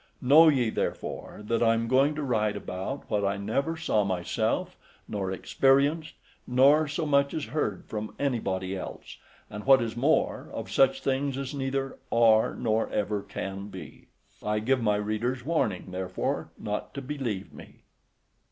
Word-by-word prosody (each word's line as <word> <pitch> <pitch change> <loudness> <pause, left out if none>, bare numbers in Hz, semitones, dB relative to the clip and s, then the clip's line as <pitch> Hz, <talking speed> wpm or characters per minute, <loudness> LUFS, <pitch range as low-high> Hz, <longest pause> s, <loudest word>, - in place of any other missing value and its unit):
Know 150 +6 +7
ye, 130 -7 +3
therefore, 105 - -4
that 115 +2 -1
I 115 -1 +4
am 115 0 -1
going 135 +4 +3
to 150 - -3
write 110 -5 0
about 95 +10 -5
what 105 -1 0
I 100 0 0
never 140 +11 -1
saw 110 -9 +1
myself, 90 -3 -1 0.3
nor 95 -2 -3
experienced, 140 - +2 0.3
nor 140 +5 +5
so 155 +3 -2
much 140 -1 +2
as 155 -3 -2
heard 105 - -1
from 110 0 -5
anybody 95 -9 -1
else, 95 - -8 0.3
and, 105 0 -8
what 135 0 +7
is 115 -1 -3
more, 140 +7 +1
of - - -6
such 135 0 +3
things 135 0 0
as 135 0 -4
neither 135 -1 -3
are, 115 -2 +4
nor 110 -2 0
ever 105 0 -1
can 95 0 -6
be. 105 - -11 0.3
I 105 0 -1
give 125 +4 +1
my 105 -2 +2
readers 110 +4 -2
warning, 110 - -1
therefore, 90 0 -3
not 105 0 -4
to 140 - -4
believe 125 -8 -4
me. - - -14
120 Hz, 160 wpm, -27 LUFS, 105-140 Hz, 0.3 s, Know